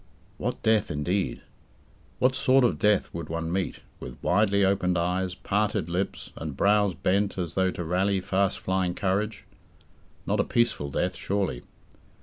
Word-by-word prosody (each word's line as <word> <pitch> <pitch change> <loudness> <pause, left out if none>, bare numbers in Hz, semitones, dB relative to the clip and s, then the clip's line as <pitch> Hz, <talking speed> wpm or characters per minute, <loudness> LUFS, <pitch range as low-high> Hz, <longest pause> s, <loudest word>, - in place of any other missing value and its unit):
What 125 - -3
death, 110 -3 +3
indeed? 90 +6 -1 0.8
What 130 +1 +3
sort 130 +1 +4
of 120 - +2
death 105 -1 +2
would 85 -2 -6
one 80 0 -3
meet 95 0 -2 0.2
with - - -8
widely 100 -1 +3
opened 90 -2 +1
eyes, 90 +2 -1
parted 105 -4 -1
lips, 90 +3 -3
and 75 -4 -6
brows 100 -2 +3
bent 100 +5 0
as 85 -3 -3
though 95 0 +2
to 90 - -4
rally 95 +4 +1
fast 95 +1 0
flying 95 -1 -1
courage? 100 +1 -1 0.8
Not - - 0
a - - +4
peaceful 120 -12 0
death 70 - -1
surely. 95 -11 -2
95 Hz, 150 wpm, -27 LUFS, 90-100 Hz, 0.8 s, sort